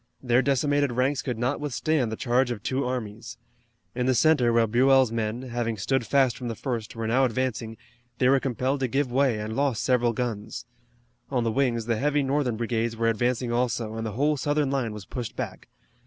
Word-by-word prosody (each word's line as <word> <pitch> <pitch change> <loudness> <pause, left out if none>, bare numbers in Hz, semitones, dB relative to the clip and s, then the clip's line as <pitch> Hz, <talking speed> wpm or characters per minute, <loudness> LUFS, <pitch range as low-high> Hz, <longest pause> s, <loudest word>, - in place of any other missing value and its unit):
Their 125 0 +3
decimated 140 0 +1
ranks 130 +3 +1
could 125 -5 -3
not 125 +5 -1
withstand 145 -3 0
the - - -2
charge 125 +2 +1
of 115 -4 -5
two 135 +1 -1
armies. 115 -4 -5 0.6
In 125 +1 -1
the 130 - +3
center 130 -2 +4
where 115 0 +4
Buell's 130 +2 +4
men, 115 +2 -2
having 120 -3 -3
stood 130 +4 -1
fast 135 -4 +3
from 125 - -6
the 115 - -3
first, 115 -3 -4
were 115 0 -3
now 125 +4 +2
advancing, 115 -3 -1 0.4
they 125 - +3
were 135 +1 +5
compelled 130 +1 -1
to 130 - 0
give 135 +1 -1
way 130 -3 +2
and 105 +1 -4
lost 140 -4 0
several 120 -2 +2
guns. 110 -3 -4 0.6
On 125 -3 0
the 115 - 0
wings 120 -3 0
the 115 -1 0
heavy 145 +3 +1
Northern 135 -4 0
brigades 115 0 -1
were 115 0 +2
advancing 120 +2 0
also, 120 -2 -1
and 115 0 -4
the 110 -2 -4
whole 145 +6 +1
Southern 145 0 0
line 130 -5 -1
was 105 -2 -8
pushed 120 -3 -6
back. - - -6
125 Hz, 200 wpm, -26 LUFS, 115-135 Hz, 0.6 s, were